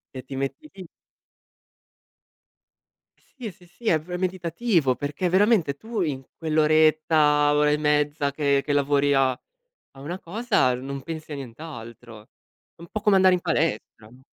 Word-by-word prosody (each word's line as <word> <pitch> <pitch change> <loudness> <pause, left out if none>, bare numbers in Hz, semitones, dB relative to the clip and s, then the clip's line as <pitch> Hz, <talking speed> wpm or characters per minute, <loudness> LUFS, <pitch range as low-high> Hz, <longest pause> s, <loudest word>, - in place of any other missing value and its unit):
E 130 - -6
ti 135 +1 -8
metti 135 - -4
lì 185 -3 -10 2.3
Sì, 240 -7 -10
sì, 180 0 -21
sì. 200 +7 -18
È 160 - +4
pr 180 +3 -13
è - - -1
meditativo, 180 - 0
perché 150 +5 -2
veramente 190 -6 +3
tu 220 -2 -4
in 140 -5 -2
quell'oretta, 155 -1 +3
ora 150 0 +3
e 150 - +2
mezza 150 -1 +1
che 140 -1 +1
che 145 - -1
lavori 145 0 +2
a 135 -1 +3 0.6
a 135 - -14
una 175 +6 -5
cosa, 205 - +1
non 135 +2 -6
pensi 160 0 -8
a - - -4
nient'altro. 120 -4 -10 0.5
È - - -18
un 170 - -10
po' 215 - -3
come 210 -3 +4
andare 185 -1 +5
in - - -3
palestra, 150 -8 -2
no? 130 +1 -18
155 Hz, 160 wpm, -24 LUFS, 140-180 Hz, 2.3 s, andare